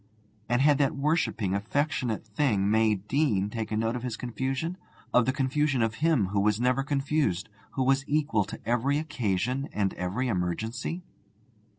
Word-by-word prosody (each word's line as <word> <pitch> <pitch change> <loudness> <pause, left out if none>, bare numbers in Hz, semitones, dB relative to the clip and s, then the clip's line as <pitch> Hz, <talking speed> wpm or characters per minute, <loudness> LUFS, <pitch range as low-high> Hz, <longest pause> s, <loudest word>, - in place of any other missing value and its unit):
And 120 +2 +3
had 145 -1 +5
that 140 -1 +2
worshipping, 140 - 0
affectionate 120 +2 -1
thing, 105 -3 +1
May 110 -1 +4
Deane, 105 -1 0
taken 110 -1 -2
note 115 +1 0
of 125 - -3
his 120 -2 -4
confusion 135 +8 -3 0.4
of 125 -1 +4
the - - +4
confusion 135 -1 +1
of 115 -1 0
him 155 - +3
who 100 +1 0
was 105 +1 +2
never 125 +2 +2
confused, 140 - 0 0.2
who 130 - 0
was 135 +1 +3
equal 145 -8 +2
to 100 - -8
every 120 +5 +2
occasion 125 -3 -1
and 100 -2 0
every 95 +9 -2
emergency? 110 - -2
125 Hz, 160 wpm, -28 LUFS, 105-140 Hz, 0.4 s, had